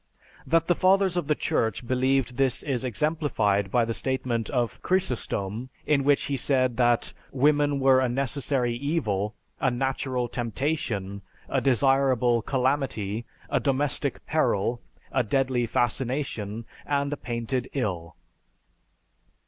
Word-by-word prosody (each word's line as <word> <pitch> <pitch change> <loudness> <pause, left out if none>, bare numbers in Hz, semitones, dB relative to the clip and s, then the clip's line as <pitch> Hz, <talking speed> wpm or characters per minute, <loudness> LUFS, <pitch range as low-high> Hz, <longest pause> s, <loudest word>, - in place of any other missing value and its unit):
That 165 0 +3
the 175 - +3
Fathers 190 +1 +3
of 175 -5 -1
the 150 - +2
Church 110 -2 -1
believed 130 0 +1
this 135 -2 +1
is 130 -4 -1
exemplified 125 - 0
by 120 +3 +2
the 115 - -2
statement 125 -3 -2
of 120 -4 -1
Chrysostom 125 - -1 0.2
in 140 -2 +2
which 145 0 +3
he 140 - -1
said 130 -2 +1
that 120 -1 +2 0.2
women 145 +1 +2
were 135 -1 +5
a 130 -1 +1
'necessary 130 -1 0
evil, 110 - -1 0.2
a - - +2
natural 130 0 -1
temptation, 115 -5 -2 0.3
a 135 - 0
desirable 130 -2 +3
calamity, 125 -5 -1 0.2
a - - +1
domestic 140 0 -1
peril, 115 +5 +1 0.3
a 130 - +2
deadly 125 0 0
fascination, 115 -2 -2 0.2
and 140 0 0
a - - -1
painted 120 +1 -3
ill.'" 90 - -3
130 Hz, 125 wpm, -26 LUFS, 115-140 Hz, 0.3 s, were